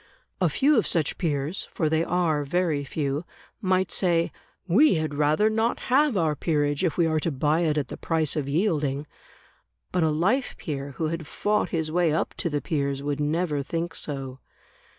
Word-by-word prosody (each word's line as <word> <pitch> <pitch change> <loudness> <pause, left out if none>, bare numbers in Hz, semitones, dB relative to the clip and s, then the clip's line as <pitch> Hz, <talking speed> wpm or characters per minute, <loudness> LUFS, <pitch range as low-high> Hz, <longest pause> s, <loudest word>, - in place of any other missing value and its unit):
A - - +4
few 290 +2 +3
of - - -1
such 160 -4 0
peers 155 0 -1
(for 160 - 0
they 160 +1 +2
are 170 -4 +1
very 155 -1 0
few) 140 +1 -2 0.4
might 185 -2 +1
say, 170 -3 +2 0.4
"We 215 - +5
had 155 -2 -1
rather 150 +8 +3
not 225 +2 +1
have 285 -4 +4
our 160 -4 +1
peerage 145 -1 0
if 165 -5 0
we 170 - +4
are 160 -1 +1
to 165 - -1
buy 150 +3 +1
it 155 -3 +1
at 140 -4 -1
the - - -6
price 160 -3 0
of 145 -3 -2
yielding". 150 -4 0 0.9
But 180 - +1
a 160 - +3
life 190 - +1
peer 140 -2 -5
who 160 - 0
had 165 -2 -4
fought 210 +6 0
his 160 -2 -2
way 175 -1 +2
up 160 - -1
to 170 - -1
the 145 -2 -1
peers, 140 -3 -2
would 145 0 -2
never 150 0 0
think 165 +4 -3
so. 135 -3 -5
160 Hz, 190 wpm, -26 LUFS, 145-175 Hz, 0.9 s, We